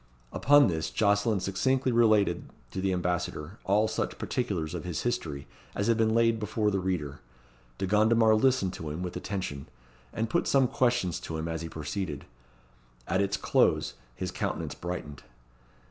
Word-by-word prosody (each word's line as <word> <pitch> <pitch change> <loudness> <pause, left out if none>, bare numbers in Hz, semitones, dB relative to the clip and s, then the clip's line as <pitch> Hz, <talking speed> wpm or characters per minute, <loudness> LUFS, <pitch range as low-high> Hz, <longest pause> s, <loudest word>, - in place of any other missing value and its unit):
Upon 145 0 +6
this 80 -3 -1
Jocelyn 105 0 +2
succinctly 130 +8 +1
related 110 -4 +3 0.2
to 95 - -3
the 95 0 +1
Ambassador 90 0 -2
all 105 +3 +3
such 110 - -3
particulars 95 - -2
of 90 - -4
his 90 -3 -3
history 80 -13 -2 0.3
as 100 - -1
have 115 0 +3
been 110 -1 +2
laid 115 -1 +3
before 105 +1 0
the 100 - 0
reader. 85 -7 -2 0.6
De - - -1
Gondomar 110 +3 +4
listened 110 -5 +2
to 80 - -6
him 80 +4 -4
with 90 - -5
attention, 90 -9 -4 0.4
and 115 +1 -2
put 115 - 0
some 135 -2 +4
questions 120 -9 +1
to 80 - -5
him 80 +1 -3
as 80 -1 -3
he 85 - -5
proceeded. 80 -1 -4 0.8
At 95 - +1
its 100 0 0
close - - +2 0.2
his - - -4
countenance - - -3
brightened. 85 -5 -6
100 Hz, 160 wpm, -28 LUFS, 85-115 Hz, 0.8 s, Upon